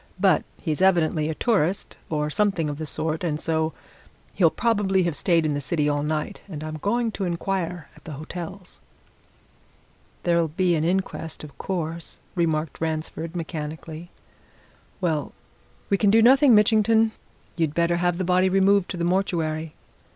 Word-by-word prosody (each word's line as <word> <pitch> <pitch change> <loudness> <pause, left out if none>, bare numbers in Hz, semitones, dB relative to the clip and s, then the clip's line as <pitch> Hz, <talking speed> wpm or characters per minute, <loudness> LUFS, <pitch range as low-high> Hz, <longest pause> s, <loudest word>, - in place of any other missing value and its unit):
But - - +4 0.2
he's 155 -1 -2
evidently 165 -4 +3
a 160 - -2
tourist, 195 -5 0
or 150 -1 -1
something 195 -5 +1
of 145 - -7
the 155 - -4
sort, 155 +3 -2
and 155 -3 -1
so 160 0 0 0.6
he'll 170 -4 +4
probably 200 -3 +1
have 170 -3 -1
stayed 165 -1 +2
in 150 - +1
the 145 - -2
city 150 +1 0
all 145 0 +1
night, 155 +6 -2
and 155 -4 -6
I'm 155 0 -5
going 230 +7 0
to 205 - -4
inquire 175 -2 -2
at - - -19
the 155 - -6
hotels." 175 +5 -8 1.4
"There'll 170 -1 +2
be 175 +3 +1
an 155 -2 +1
inquest, 170 -3 -2
of 150 -2 -10
course," 170 -3 -4
remarked 160 -4 -1
Ransford 160 +1 -3
mechanically. 160 0 -6 0.9
"Well 160 -5 -1 0.6
we 200 - +3
can 205 - +4
do 225 +2 +5
nothing, 265 0 +7
Mitchington. 220 +1 +4 0.4
You'd 160 -3 -1
better 170 0 +2
have 175 0 +1
the 185 - -1
body 185 +1 +3
removed 195 0 +3
to 185 - -4
the 170 - -2
mortuary." 165 -4 -1
170 Hz, 160 wpm, -24 LUFS, 155-190 Hz, 1.4 s, nothing